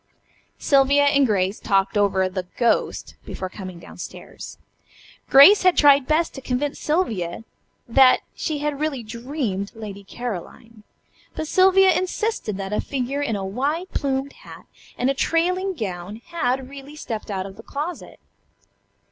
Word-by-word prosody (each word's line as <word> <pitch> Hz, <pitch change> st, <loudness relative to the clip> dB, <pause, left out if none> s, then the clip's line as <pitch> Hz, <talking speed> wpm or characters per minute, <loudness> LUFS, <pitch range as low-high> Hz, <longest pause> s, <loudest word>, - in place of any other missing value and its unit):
Sylvia 280 Hz, 0 st, +4 dB
and 280 Hz, -1 st, +4 dB
Grace 195 Hz, -1 st, 0 dB
had -, -, -13 dB
talked 195 Hz, 0 st, +2 dB
over 195 Hz, -2 st, +2 dB
the 185 Hz, -1 st, -5 dB
"ghost" 235 Hz, -2 st, 0 dB
before 185 Hz, -, -6 dB
coming 185 Hz, -2 st, -8 dB
down 170 Hz, -, -13 dB
stairs. -, -, -9 dB, 0.7 s
Grace 325 Hz, +10 st, +8 dB
had 365 Hz, -1 st, +3 dB
tried 280 Hz, -2 st, +6 dB
best 315 Hz, +2 st, +1 dB
to 270 Hz, -, -8 dB
convince 265 Hz, +3 st, -2 dB
Sylvia 225 Hz, -, -1 dB, 0.4 s
that 255 Hz, +2 st, +5 dB
she 310 Hz, -3 st, -3 dB
had 290 Hz, -1 st, -3 dB
really 300 Hz, -5 st, -2 dB
dreamed 230 Hz, -3 st, -4 dB
"Lady 205 Hz, -3 st, -8 dB
Caroline," 225 Hz, +1 st, -7 dB, 0.5 s
but 315 Hz, -, -4 dB
Sylvia 380 Hz, +2 st, +5 dB
insisted 370 Hz, -, -2 dB
that 195 Hz, +1 st, -5 dB
a -, -, 0 dB
figure 275 Hz, +1 st, -3 dB
in 235 Hz, -7 st, -1 dB
a 195 Hz, -1 st, -3 dB
wide 290 Hz, -, -2 dB
plumed 275 Hz, 0 st, -2 dB
hat -, -, -13 dB, 0.3 s
and 255 Hz, +2 st, +1 dB
a -, -, 0 dB
trailing 365 Hz, +6 st, 0 dB
gown 195 Hz, -, -5 dB
had 265 Hz, -6 st, -1 dB
really 280 Hz, +2 st, -11 dB
stepped 225 Hz, -9 st, -6 dB
out 190 Hz, -2 st, -3 dB
of 195 Hz, -1 st, -9 dB
the 220 Hz, -, -11 dB
closet. 300 Hz, +8 st, -6 dB
260 Hz, 150 wpm, -22 LUFS, 205-295 Hz, 0.7 s, Grace